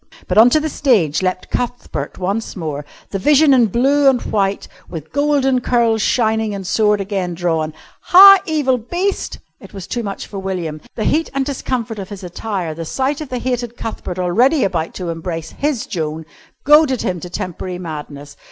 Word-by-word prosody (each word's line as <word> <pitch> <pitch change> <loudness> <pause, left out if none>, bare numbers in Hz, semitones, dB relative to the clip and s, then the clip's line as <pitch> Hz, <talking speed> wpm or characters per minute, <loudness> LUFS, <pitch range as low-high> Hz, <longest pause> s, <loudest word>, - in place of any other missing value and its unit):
But 185 +3 +3
on 230 +3 +8
to 310 - +3
the 310 - -2
stage 205 - +1
leapt 185 0 -2
Cuthbert 245 0 -4
once 200 +5 -3
more, 150 -5 -5 0.3
the 195 - -2
vision 295 +5 +5
in 245 -3 +5
blue 270 +6 +3
and 260 -2 +2
white 200 -3 -1 0.2
with 160 -3 -8
golden 280 -3 +2
curls 235 -3 +2
shining 220 -2 +1
and 195 -1 -6
sword 210 +2 +2
again 190 -3 -3
drawn. 165 -3 -1 0.3
"Ha! 390 +2 +9
evil 285 -6 +1
beast 355 - -2
" - - -49
It - - -13
was 190 -2 -7
too 240 - -3
much 200 -3 -5
for 200 - -7
William. 175 -5 -4
The 215 - -2
heat 320 +7 +1
and 275 -1 0
discomfort 250 -5 -3
of 190 - -7
his 200 -2 -9
attire, 180 -2 -4
the 165 +1 -6
sight 270 - -2
of 300 - -7
the 255 - -3
hated 245 -1 -3
Cuthbert 200 -5 -5
already 235 - +2
about 170 -4 -2
to 180 -2 -4
embrace 165 -1 -5
his 285 -5 -2
Joan, 160 -2 -4 0.4
goaded 295 -3 +5
him 180 -2 -2
to 180 - -8
temporary 180 +1 -5
madness. 150 -4 -8
210 Hz, 185 wpm, -18 LUFS, 180-260 Hz, 0.4 s, Ha